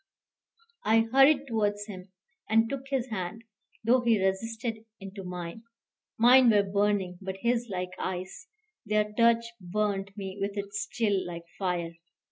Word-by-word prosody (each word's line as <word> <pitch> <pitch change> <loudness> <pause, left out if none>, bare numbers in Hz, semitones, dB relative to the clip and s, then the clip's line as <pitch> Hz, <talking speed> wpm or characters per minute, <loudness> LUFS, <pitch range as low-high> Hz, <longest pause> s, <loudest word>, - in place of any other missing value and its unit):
I 225 +1 +4
hurried 270 +2 +6
towards 205 -3 0
him, 190 -2 -10 0.4
and 225 +1 +4
took 270 +2 -5
his 265 -2 -1
hand, 215 +2 -4 0.4
though 245 +3 +4
he 230 -3 +3
resisted, 225 +4 -2 0.2
into 195 0 -8
mine. 180 +2 -6 0.6
Mine 245 +2 +7
were 205 -2 +5
burning, 200 -2 0
but 190 0 -5
his 240 0 0
like 180 -1 -3
ice: 185 - -5 0.4
their 210 -1 0
touch 235 +1 +4
burnt 195 +1 -2
me 195 0 -6
with 200 +1 -2
its 200 0 -3
chill, 205 -5 +1
like 170 -1 -6 0.2
fire. 175 -3 -1
205 Hz, 140 wpm, -28 LUFS, 190-230 Hz, 0.6 s, Mine